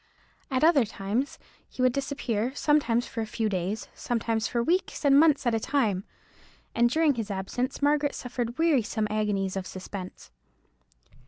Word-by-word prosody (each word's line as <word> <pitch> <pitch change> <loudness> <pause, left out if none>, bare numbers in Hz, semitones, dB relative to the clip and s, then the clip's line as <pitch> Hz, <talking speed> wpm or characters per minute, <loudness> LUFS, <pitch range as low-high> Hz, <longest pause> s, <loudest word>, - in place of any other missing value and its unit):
At 265 0 0
other 315 -5 +6
times 215 +5 -3 0.3
he 255 - -3
would 255 -1 +4
disappear, 265 -3 -2
sometimes 255 -6 +2
for 225 - -5
a 220 - -3
few 220 0 -1
days, 195 +2 -2
sometimes 225 -2 -1
for 235 -1 0
weeks 350 +1 0
and 280 0 +6
months 300 -3 +4
at 240 - +2
a 225 - +2
time; 220 -7 0 0.7
and 235 0 +3
during 315 +2 +3
his 225 -4 -4
absence 245 +8 -3
Margaret 290 0 +2
suffered 245 -1 -4
wearisome 255 -9 +2
agonies 205 -3 0
of 190 -1 -3
suspense. 185 - -8
240 Hz, 155 wpm, -27 LUFS, 215-280 Hz, 0.7 s, other